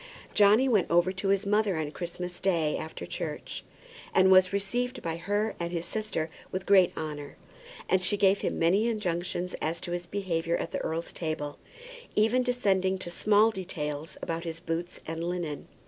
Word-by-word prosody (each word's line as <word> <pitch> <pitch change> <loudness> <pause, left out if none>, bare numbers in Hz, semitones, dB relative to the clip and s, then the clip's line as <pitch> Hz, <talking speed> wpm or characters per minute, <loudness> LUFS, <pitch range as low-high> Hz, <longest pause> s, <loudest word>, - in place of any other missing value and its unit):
Johnny 210 +5 +6
went 215 -8 +3
over 175 +2 +4
to 190 +1 -3
his 195 0 +2
mother 210 -3 +2
on 155 -2 -2
Christmas 180 +1 -5
Day 165 -5 +1
after 160 0 -6
church, - - -5 0.5
and 190 0 +6
was 185 -1 +7
received 245 +6 -2
by 165 -1 -2
her 205 +5 0
and 170 0 -2
by 175 - -5
his 170 0 -2
sister 215 -7 -2 0.2
with 185 +1 -3
great 190 -3 +6
honour. 150 -2 -5 0.5
And 190 - +3
she 190 +3 +1
gave 195 0 +4
him - - -1
many 190 +7 +3
injunctions 180 -4 -2
as 165 +2 -1
to 175 - -5
his 175 0 -3
behaviour 170 -4 -1
at - - -4
the - - -2
earl's 165 +1 -3
table, 155 -3 -4 0.6
even 225 +4 +4
descending 195 -7 +1
to 175 -2 -5
small 215 +4 +4
details 160 -6 -5
about 165 0 -2
his 165 -1 -5
boots 170 +1 -4
and 165 +1 -4
linen. 170 -4 -3
180 Hz, 180 wpm, -29 LUFS, 165-200 Hz, 0.6 s, was